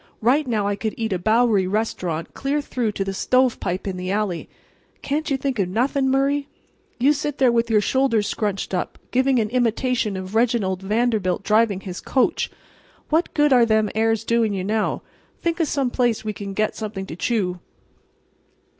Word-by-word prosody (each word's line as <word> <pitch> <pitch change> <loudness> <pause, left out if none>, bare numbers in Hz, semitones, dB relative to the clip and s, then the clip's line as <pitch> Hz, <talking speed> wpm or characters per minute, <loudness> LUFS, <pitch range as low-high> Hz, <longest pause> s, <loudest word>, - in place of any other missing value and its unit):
Right 265 +6 +2
now 215 -4 0
I 205 0 0
could 215 +1 -3
eat 225 -3 -1
a 180 - -1
Bowery 215 -1 +3
restaurant 185 -5 -2
clear 280 +2 -1
through 245 -6 -2
to 195 - -1
the 195 - -3
stovepipe 240 -5 +1
in 190 -2 -3
the 180 0 -4
alley. 200 -4 -2 0.5
Can't 305 +3 -1
you 275 - +1
think 265 -3 -2
of 185 -2 +1
nothing, 265 +6 +1
Murray? 275 +1 +1 0.5
You 275 +4 +4
sit 295 0 -3
there 260 -3 +4
with 235 0 +1
your 215 -2 +4
shoulders 230 -1 +2
scrunched 200 -3 -2
up, 180 - -2
giving 260 +1 +3
an 215 -2 0
imitation 240 -3 0
of 185 +1 -7
Reginald 220 -5 +1
Vanderbilt 210 -2 0
driving 215 -2 +2
his 185 -2 -7
coach—what 310 +4 -2
good 295 -2 +4
are 245 -2 +6
them 220 -2 +2
airs 225 0 +1
doing 225 -3 +1
you 185 - -2
now? 215 +2 -1 0.4
Think 335 0 -1
of 330 - +2
some 270 -4 0
place 240 -4 0
we 215 - -2
can 200 -1 -7
get 215 +1 0
something 210 -3 -5
to 160 - -7
chew." 180 -3 -1
225 Hz, 180 wpm, -22 LUFS, 200-255 Hz, 0.5 s, are